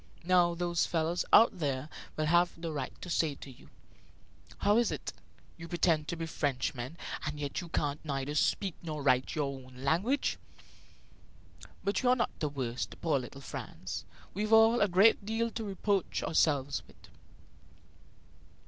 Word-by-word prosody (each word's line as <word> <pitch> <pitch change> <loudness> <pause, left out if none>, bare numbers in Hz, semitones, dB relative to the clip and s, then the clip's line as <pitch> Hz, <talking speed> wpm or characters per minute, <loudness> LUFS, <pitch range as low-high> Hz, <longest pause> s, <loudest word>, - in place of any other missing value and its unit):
Now 175 -1 +4
those 175 -1 0
fellows 165 +1 0
out 220 -5 +6
there 140 -2 -1 0.3
will 155 - +1
have 175 +2 +3
the 165 -1 -4
right 140 -4 -5
to - - -6
say 160 -4 +1
to 135 - -10
you: 125 - -17 0.9
'How 205 +3 +3
is 240 - +2
it; - - -5 0.4
you 165 0 -8
pretend 165 -3 +1
to - - -2
be 165 0 -4
Frenchmen, 135 -2 -2 0.3
and 150 0 -4
yet 145 -1 -3
you 175 - -9
can 145 -3 -1
neither 140 -1 -3
speak 185 +4 +1
nor 155 -4 -5
write 130 -2 +2
your 145 -3 -1
own 130 0 -15
language?' 195 - +1 1.4
But 200 - 0
you 245 - +3
are 250 - +6
not 240 - 0
the 150 - 0
worst, 130 -3 -4
poor 155 -5 +1
little 130 +2 -9
Franz. - - -6 0.3
We've 210 +3 -2
all 225 +2 +6
a 205 - +5
great 200 +4 +5
deal 225 +2 -1
to 225 - -4
reproach 200 -1 -1
ourselves 145 -4 +1
with. - - -19
165 Hz, 160 wpm, -31 LUFS, 145-195 Hz, 1.4 s, out